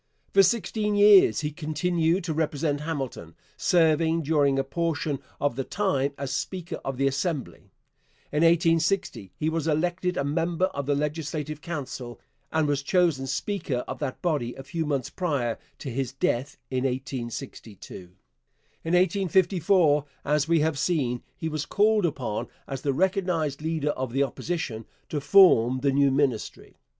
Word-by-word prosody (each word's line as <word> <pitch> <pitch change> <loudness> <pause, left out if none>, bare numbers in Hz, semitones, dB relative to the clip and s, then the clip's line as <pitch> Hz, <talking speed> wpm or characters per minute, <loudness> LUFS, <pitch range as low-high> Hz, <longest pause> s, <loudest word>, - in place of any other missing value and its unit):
For 195 - +7
sixteen 210 +1 +1
years 205 -4 +6
he 150 -1 -2
continued 165 +3 0
to 165 -2 -2
represent 150 -1 -1
Hamilton, 135 - -5 0.2
serving 165 -1 +2
during 140 -2 +2
a 135 - +2
portion 150 0 -2 0.2
of 145 -4 0
the 135 - -2
time 140 -7 0
as 140 -1 -4
speaker 180 -3 -4
of 135 -1 -4
the 135 - +1
Assembly. 135 +1 -2 0.6
In 150 - 0
1860 165 - +2
he 155 - -1
was 160 -1 -1
elected 175 +3 0
a - - +1
member 165 +5 0
of 140 -1 -4
the 145 - +2
Legislative 150 0 -3
Council, 130 -7 -6 0.3
and 160 -1 +1
was 145 -1 0
chosen 155 -4 +1
speaker 135 -2 -2
of 130 - -6
that 140 -3 -4
body 145 -9 -1
a 135 - -9
few 160 +3 -3
months 140 -4 -2
prior 140 -10 -1 0.2
to 135 - -6
his 130 0 -2
death 135 0 -1
in 130 -1 0
1862. 125 -4 -5 0.9
In 165 - -2
1854, 180 -3 +3 0.2
as 150 +1 +1
we 165 -1 +3
have 155 -2 0
seen, 130 -9 0 0.2
he 160 - -3
was 155 -2 -3
called 210 -2 +3
upon, 125 -8 -3 0.2
as 135 -1 -5
the 140 - 0
recognized 170 -3 0
leader 155 -2 -1
of 130 -4 -4
the 135 +1 +3
Opposition, 135 -6 -4 0.2
to 150 - -2
form 135 - +5
the 140 0 +2
new 140 0 +4
Ministry. 135 -5 -2
150 Hz, 155 wpm, -26 LUFS, 135-170 Hz, 0.9 s, For